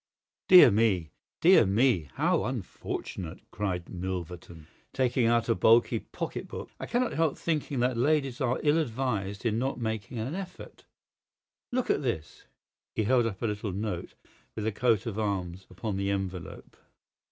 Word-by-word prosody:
"Dear 180 -10 +9
me, 100 -7 +2 0.3
dear 185 -2 +7
me, 100 - +2
how - - +2
unfortunate!" 85 -4 -5
cried 90 -4 -3
Milverton, 90 -3 -6 0.3
taking 125 -2 +2
out 115 -1 +2
a 115 - +3
bulky 115 +1 +4
pocket - - -6
book. - - -8
"I - - -5
cannot 245 +1 0
help 160 -3 +1
thinking 150 -5 -1
that 125 0 +1
ladies 135 0 +1
are 125 -1 +1
ill 150 +2 +4
advised 110 -7 -2
in 110 -1 +1
not 130 0 -2
making 110 0 -3
an 115 +7 -3
effort. 185 0 -8 0.9
Look 255 0 0
at - - +1
this!" 95 - -4 0.5
He 110 - +1
held 120 +1 +3
up 105 0 -6
a - - +2
little 105 -2 -2
note 100 -3 -4 0.4
with 105 - -3
a 110 - +1
coat 115 0 +1
of 110 -2 -3
arms 95 -3 -3
upon 95 +2 -4
the 100 0 -1
envelope. 95 -3 -5
110 Hz, 155 wpm, -28 LUFS, 95-130 Hz, 0.9 s, Dear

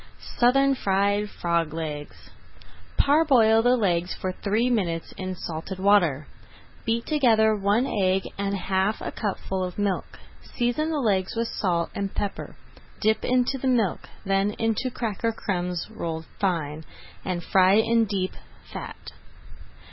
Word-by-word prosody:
SOUTHERN 275 +3 +4
FRIED 205 -2 +1
FROG 170 -4 -1
LEGS 150 -3 -6 0.7
Parboil 265 -7 +5
the 245 +2 +4
legs 180 -5 0
for 185 - -3
three 215 +5 0
minutes 180 -9 -1
in 185 0 -4
salted 170 +2 -6
water. 185 -7 +3 0.6
Beat 230 +1 0
together 225 -8 +3
one 205 +4 +2
egg 190 -5 +1
and 200 0 -2
half 190 +2 0
a - - -5
cupful 190 -2 -3
of 180 -1 -5
milk. 200 -3 -2 0.4
Season 245 +6 0
the 315 - -1
legs 200 -8 0
with 230 0 -1
salt 170 -4 -1
and 200 -1 -4
pepper, 200 - -4 0.4
dip 220 0 +1
into 255 +2 +1
the 265 - -2
milk, 230 -8 +1 0.2
then 195 +1 +1
into 225 +3 0
cracker 230 -2 -2
crumbs 180 -5 -3
rolled 165 -6 -4
fine, 160 -6 -1 0.4
and 175 -2 -3
fry 190 +1 +4
in 225 +1 +3
deep 190 -3 -2 0.4
fat. - - -8
200 Hz, 135 wpm, -25 LUFS, 185-230 Hz, 0.7 s, Parboil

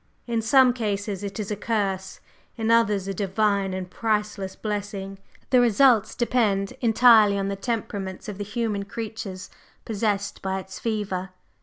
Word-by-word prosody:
In 230 -2 -1
some 250 +2 +5
cases 205 -4 -3
it 200 +2 -5
is 210 0 -4
a - - 0
curse; 200 -3 -2 0.4
in 225 0 0
others, 210 -4 +3
a 195 - -2
divine 200 0 0
and 185 -1 -4
priceless 210 -2 -2
blessing. 205 -2 -4 0.3
The 250 -2 +6
results 240 -1 +4
depend 215 -5 +1
entirely 225 -3 +6
on 195 0 -1
the 200 - -2
temperaments 195 -3 -4
of 205 -2 -6
the - - -2
human 210 -1 -2
creatures 210 -3 -6 0.3
possessed 205 -2 -1
by 190 0 -2
its 190 0 -9
fever. 205 -4 -2
205 Hz, 150 wpm, -25 LUFS, 195-225 Hz, 0.4 s, The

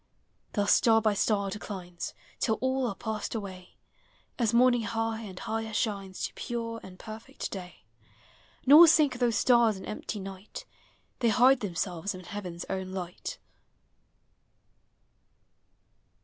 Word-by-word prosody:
Thus 205 -2 +3
star 225 -1 +5
by 215 -1 +2
star 200 -1 +1
declines, 185 -4 -6 0.2
Till 220 - +2
all 260 +2 0
are 200 - -3
passed 220 +1 -4
away. 190 -4 -7 0.6
As 230 -3 +2
morning 245 0 +5
high 225 +1 -2
and 195 -4 -9
higher 220 +2 -3
shines, 200 -3 -2
To - - -6
pure 230 -1 -4
and 185 -1 -12
perfect 225 +7 -7
day; 180 -2 -8 0.8
Nor 300 +6 +10
sink 300 -6 +4
those 240 -3 +2
stars 235 -4 +4
in 190 - -9
empty 210 0 -5
night; 195 +1 -8 0.5
They 235 - +3
hide 250 +3 +5
themselves 185 -2 -3
in 185 - -9
heaven's 180 -2 -6
own 190 -1 -3
light. 185 - -5
215 Hz, 130 wpm, -29 LUFS, 190-235 Hz, 0.8 s, Nor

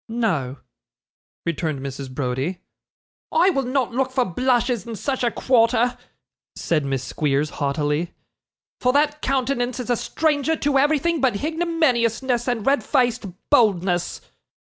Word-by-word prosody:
'No,' 175 - -1 0.9
returned 160 -3 -2
Mrs. 135 0 -6
Browdie. 130 +6 -2 0.7
'I 350 +4 +4
will 275 - 0
not 255 -1 -1
look 260 +2 0
for 255 -1 +1
blushes 240 +2 0
in 230 - -5
such 265 +5 -2
a 240 - +3
quarter,' 245 0 +2 0.6
said 155 -3 0
Miss 135 -2 -2
Squeers, 150 0 -1
haughtily, 150 +3 -1 0.7
'for 250 0 +2
that 295 +1 +2
countenance 255 -2 -1
is 245 0 -3
a - - +3
stranger 310 +4 0
to 285 -2 +1
everything 310 +3 +2
but 255 -5 +2
hignominiousness 265 -5 0
and 240 -4 -1
red 280 +1 +2
faced 245 -4 +1 0.2
boldness. 185 -9 +2
240 Hz, 130 wpm, -22 LUFS, 170-270 Hz, 0.9 s, I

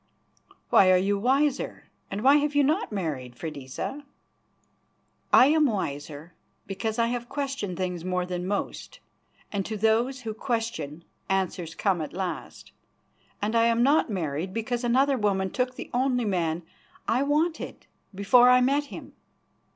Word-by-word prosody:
"Why 185 - +6
are 185 - +6
you 200 +2 +1
wiser, 270 +5 0 0.3
and 200 +2 -4
why 275 +2 +7
have 295 0 0
you 290 - +5
not 310 - 0
married, 145 - -4
Freydisa?" 150 - -6 1.3
"I - - +8
am 305 +1 +4
wiser 155 - -4 0.3
because 215 +3 -3
I 230 - +3
have 240 0 -4
questioned 275 -10 -3
things 180 -2 -3
more 180 0 -1
than 180 0 -4
most, 205 - -4 0.5
and 200 -2 -1
to 215 - -4
those 230 +5 +1
who 225 -3 -4
question 215 - -3 0.3
answers 185 -3 -1
come 190 -5 0
at 155 - -6
last. 185 -1 -5 0.7
And 215 +2 0
I 230 0 +4
am 230 0 +3
not 285 +1 +3
married 175 -1 -3
because 240 +2 -2
another 260 +3 +2
woman 190 -3 0
took 250 0 -1
the - - -8
only 250 -1 +1
man 170 -4 -1 0.4
I 245 +3 +2
wanted 305 +4 -1 0.3
before 240 +6 +5
I 250 0 +7
met 280 +3 +2
him. - - -10
220 Hz, 150 wpm, -26 LUFS, 180-255 Hz, 1.3 s, I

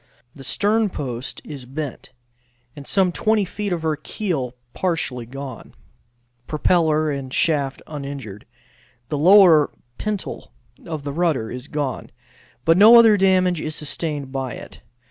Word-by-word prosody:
The 135 - -12
sternpost 165 - -1
is 135 -5 -9
bent, 140 0 -6 0.6
and 145 -2 -10
some 190 -2 +2
20 215 +2 +1
feet 205 +2 -4
of 170 -2 -2
her 160 -1 +1
keel 150 - -3 0.2
partially 140 -10 -2
gone; 135 -1 -9 0.7
propeller 155 -1 +2
and 135 -2 -5
shaft 140 -3 0
uninjured. 140 -8 -7 0.6
The 150 - -2
lower 175 -3 +7 0.3
pintle 210 -2 -5 0.3
of 160 -3 -5
the 140 -1 -4
rudder 155 -9 0
is 125 +2 -7
gone, 145 -4 -3 0.6
but 165 +1 +5
no 220 +3 +9
other 225 -2 +7
damage 185 -3 +2
is 155 0 -4
sustained 150 -2 -4
by 135 -2 -3
it. - - -11
155 Hz, 130 wpm, -21 LUFS, 135-180 Hz, 0.7 s, no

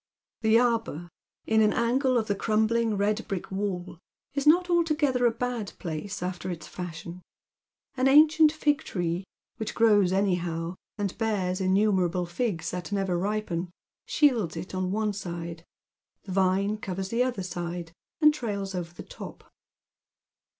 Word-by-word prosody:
The 220 0 +5
arbour, 225 -9 0 0.4
in 220 0 +3
an 215 -1 +4
angle 255 +2 +2
of 225 - +1
the 205 - 0
crumbling 220 +1 +1
red 210 +2 0
brick 195 -2 -4
wall, 190 -3 -3 0.3
is 280 +1 -1
not 355 +4 +6
altogether 305 -8 +2
a - - +3
bad 235 -3 -3
place 175 +4 -5
after 180 0 -4
its 165 -3 -5
fashion. 175 0 -7 0.7
An 260 0 +2
ancient 305 +2 +7
fig 300 -2 +1
tree, 175 0 -2 0.3
which 220 -3 -4
grows 205 -5 +4
anyhow, 175 -3 0 0.2
and 200 -3 -2
bears 195 -4 0
innumerable 185 -2 +2
figs 175 -2 -2
that 180 +2 -5
never 195 -3 0
lipen, 185 -2 -2 0.4
shields 230 - +2
it 175 +4 -6
on 185 0 -1
one 215 0 0
side, 170 -3 -6 0.6
the 195 - -8
vine 195 +2 +2
covers 190 -1 -4
the 230 +3 +1
other 250 -6 0
side, 175 -1 -5 0.3
and 305 0 +7
trails 200 -8 -3
over 175 -2 -4
tiie - - -24
top. - - -10
200 Hz, 145 wpm, -27 LUFS, 180-230 Hz, 0.7 s, ancient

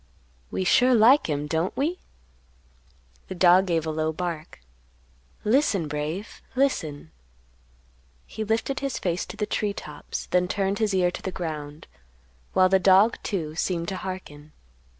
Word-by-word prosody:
"We - - -2
sure 250 +7 +4
like 240 +6 +6
him, 145 0 -1
don't 160 +4 -1
we?" 325 +7 -1 1.3
The - - -6
dog 180 +1 +5
gave 165 -2 0
a 160 - -2
low 155 0 -1
bark. 165 - -5 0.8
"Listen, 215 - +2
Brave, 150 +8 -5
listen." 160 - -1 1.1
He 220 - -5
lifted 225 +5 -1
his 275 -2 -3
face 175 -2 -2
to - - -9
the 210 - -1
tree 210 0 -1
tops, 150 -6 -7
then 180 0 +3
turned 195 +2 -1
his 210 -3 +1
ear 180 -1 +2
to - - -7
the 190 - -4
ground, 155 -4 -6 0.7
while 185 0 +5
the 190 +1 +3
dog, 195 +4 +5
too, 160 -7 -3
seemed 170 0 -2
to 190 - -4
hearken. 155 -6 -8
185 Hz, 150 wpm, -25 LUFS, 160-210 Hz, 1.3 s, like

